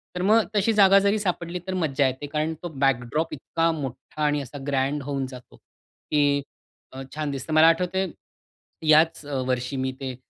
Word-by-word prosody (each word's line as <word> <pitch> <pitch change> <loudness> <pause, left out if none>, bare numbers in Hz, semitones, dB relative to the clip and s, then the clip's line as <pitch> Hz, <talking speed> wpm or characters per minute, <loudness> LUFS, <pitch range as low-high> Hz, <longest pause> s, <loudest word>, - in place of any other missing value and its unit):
तर 180 - -2
मग 215 +4 +4
तशी 210 +2 +2
जागा 195 0 +7
जरी 200 +2 +2
सापडली 180 -3 -2
तर 190 - -2
मज्जा 145 -6 +1
येते 130 +3 -4
कारण 155 +1 -1
तो 175 - -4
बॅकड्रॉप 135 +4 0
इतका 165 +3 0
मोठा 135 0 -6
आणि 145 -1 +1
असा 140 +2 -9
ग्रँड 140 +1 0
होऊन 140 -1 -2
जातो, 125 -1 -12
की 145 -1 -2 0.5
अ, 130 - -8
छान 150 -2 -2
दिसतं. 140 +3 -5
मला 155 +1 +7
आठवतंय 180 +3 +1 0.8
याच 155 0 +4
अ, 145 -1 -4
वर्षी 125 +1 -1
मी 130 0 -1
ते 130 -2 -4
150 Hz, 175 wpm, -25 LUFS, 135-170 Hz, 0.8 s, जागा